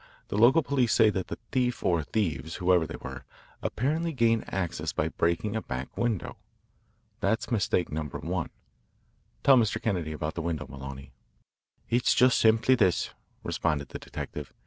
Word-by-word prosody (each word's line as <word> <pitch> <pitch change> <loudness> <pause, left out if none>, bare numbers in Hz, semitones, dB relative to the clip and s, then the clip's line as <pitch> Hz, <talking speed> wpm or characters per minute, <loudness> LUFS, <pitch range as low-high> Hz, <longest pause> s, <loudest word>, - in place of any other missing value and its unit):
The - - -3
local 125 +9 +6
police 125 -6 +2
say 110 +1 +5
that 95 -2 -3
the - - -5
thief 125 -2 0
or 85 -3 +2
thieves, 80 -4 -2
whoever 90 -2 +3
they - - -6
were, 65 -1 -8 0.4
apparently 160 +7 -1
gained 115 -3 +1
access 90 -3 -2
by 75 - 0
breaking 85 +7 0
a 110 - -1
back 65 -5 -6
window. 115 -6 -2 0.8
That's 110 - 0
mistake 95 -5 +1
number 75 -2 -4
one. - - -3 0.9
Tell 135 -1 +7
Mr. 110 -4 +2
Kennedy 90 -8 -1
about 75 0 -3
the 85 - -4
window, 80 -2 -2
Maloney." 70 0 -9 0.8
"It's 120 +2 +2
just 125 0 +5
simply 115 +3 +4
this," 95 -8 +2 0.3
responded 75 -4 -1
the - - -7
detective. - - -7
95 Hz, 155 wpm, -28 LUFS, 80-120 Hz, 0.9 s, Tell